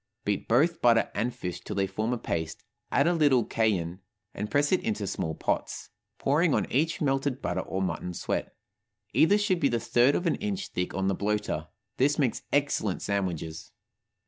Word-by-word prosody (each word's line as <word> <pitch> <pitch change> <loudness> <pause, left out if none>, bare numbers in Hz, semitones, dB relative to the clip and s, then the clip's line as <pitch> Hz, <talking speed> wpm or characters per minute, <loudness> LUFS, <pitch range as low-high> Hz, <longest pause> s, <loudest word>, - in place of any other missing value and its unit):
Beat 100 -1 -1
both 160 +9 +3
butter 115 -1 +4
and 120 +3 0
fish 90 -6 -6
till 105 - -6
they 100 0 +2
form 110 +5 -2
a 125 - 0
paste, 80 -7 -3 0.3
add 140 - +3
a 175 - +3
little 145 -8 +4
cayenne, 95 -6 0 0.3
and 105 - -4
press 145 +3 +2
it 185 - +3
into 105 -2 -2
small 80 -4 -3
pots, - - -2 0.3
pouring 150 +3 +2
on - - +1
each 160 +5 +1
melted 135 -2 0
butter, - - -2
or 95 0 -3
mutton 90 -1 -3
suet. - - -2 0.6
Either 200 +6 +5
should 205 -4 +1
be 140 - +3
the 120 - 0
third 120 +5 +3
of 175 - -1
an 165 - +2
inch 200 -2 -3
thick 90 0 -3
on 95 +1 0
the 95 - +2
bloater. 100 -6 -1 0.3
This 145 +3 +3
makes 130 -6 +1
excellent 140 -9 0
sandwiches. 90 -6 -3
115 Hz, 185 wpm, -28 LUFS, 95-145 Hz, 0.6 s, Either